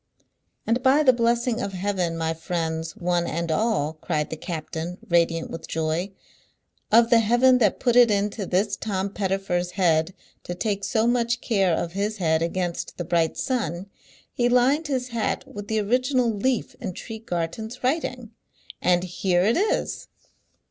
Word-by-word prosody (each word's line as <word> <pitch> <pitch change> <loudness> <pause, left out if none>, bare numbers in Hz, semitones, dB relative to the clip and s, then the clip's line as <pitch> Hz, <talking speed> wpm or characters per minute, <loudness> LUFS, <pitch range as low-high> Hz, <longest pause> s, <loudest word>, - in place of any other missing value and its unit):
"And 235 +3 +1
by 275 +4 +4
the 260 -3 +6
blessing 235 0 +1
of 200 - -3
Heaven, 185 -3 -1
my 160 0 -1
friends, 160 0 -3
one 175 -3 0
and 170 0 -2
all," 160 -5 +1
cried 150 -3 -2
the - - -2
captain, 165 +1 -5
radiant 165 -1 +1
with 165 0 -7
joy, 160 +4 -1 0.8
"of 230 +2 +5
the 235 - +7
Heaven 240 +3 +4
that 210 -5 +2
put 240 -2 +1
it 245 -1 +7
into 205 -1 -1
this 200 +3 +1
Tom 200 -2 -3
Pettifer's 190 -3 -1
head 175 -1 +2 0.3
to 175 - -6
take 200 +1 -2
so 220 +1 +1
much 240 0 +1
care 195 -7 +1
of 170 - -3
his 205 +4 -2
head 160 -4 +1
against 175 +1 -3
the 175 - -4
bright 165 -1 +1
sun, 195 - -2 0.4
he 240 0 +1
lined 265 +6 +3
his 255 -3 -2
hat 230 -2 -2
with 205 0 -8
the 220 - -1
original 250 +3 +1
leaf 235 +3 -1
in 185 - -4
Tregarthen's 220 +1 -5
writing, 255 -4 -1 0.5
and 180 0 +3
here 180 0 0
it 220 +4 +3
is!" 410 +4 -1
200 Hz, 160 wpm, -24 LUFS, 170-235 Hz, 0.8 s, the